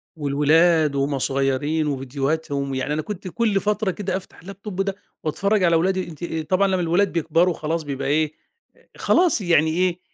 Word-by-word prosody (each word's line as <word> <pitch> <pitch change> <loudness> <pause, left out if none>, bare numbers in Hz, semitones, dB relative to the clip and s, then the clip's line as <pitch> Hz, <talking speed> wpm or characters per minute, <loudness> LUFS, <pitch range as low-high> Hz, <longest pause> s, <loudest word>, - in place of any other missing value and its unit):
والولاد 155 +1 +3
وهم 140 0 0
صغيرين، 135 +4 0
وفيديوهاتهم 140 +1 -2
يعني 130 +3 -2
أنا 155 - -1
كنت 195 +1 -7
كُلّ 205 +2 +1
فترة 210 -1 0
كده 190 0 -3
أفتح 190 - -12
اللاب 195 +3 -11
توب 195 -3 -3
ده 195 0 -2 0.3
وأتفرّج 200 +6 +1
على 170 -1 +4
ولادي، 185 +3 +1
أنتِ 170 0 -7 0.2
طبعًا 190 +1 +3
لمّا 185 -2 0
الولاد 175 +4 +2
بيكبروا 165 +2 +2
خلاص 160 +1 -3
بيبقى 140 -2 -4
إيه، 155 +1 +1 0.6
خلاص 345 -10 +3
يعني 170 -4 +3
إيه، 180 +1 0
165 Hz, 165 wpm, -22 LUFS, 145-190 Hz, 0.6 s, على